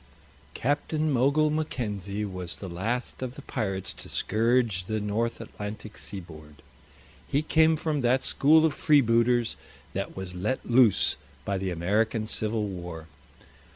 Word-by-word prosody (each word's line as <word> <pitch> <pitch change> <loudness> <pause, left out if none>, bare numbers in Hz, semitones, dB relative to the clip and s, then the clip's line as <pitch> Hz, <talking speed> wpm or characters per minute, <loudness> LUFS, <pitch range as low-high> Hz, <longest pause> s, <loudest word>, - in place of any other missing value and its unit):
Captain 150 +3 0
Mogul 140 +4 +3
Mackenzie 105 - -2
was 90 -3 -3
the 100 - -7
last 110 +11 -3
of 130 0 -4
the - - -10
pirates 95 -5 -3
to - - -8
scourge 115 -3 +1
the 110 +3 -1
North 105 +3 -1
Atlantic 105 -1 -7
seaboard. 80 -6 -9 0.6
He 145 +3 +1
came 160 0 +4
from 150 -2 -1
that 125 +2 +2
school 155 +3 +5
of 160 - +2
freebooters 120 -5 +3 0.4
that - - -4
was 95 -1 -5
let 105 +9 -2
loose 120 -4 +4 0.3
by 100 -1 -1
the 95 0 -2
American 105 +6 0
Civil 110 0 0
War. 85 -4 -7
110 Hz, 135 wpm, -27 LUFS, 95-130 Hz, 0.6 s, school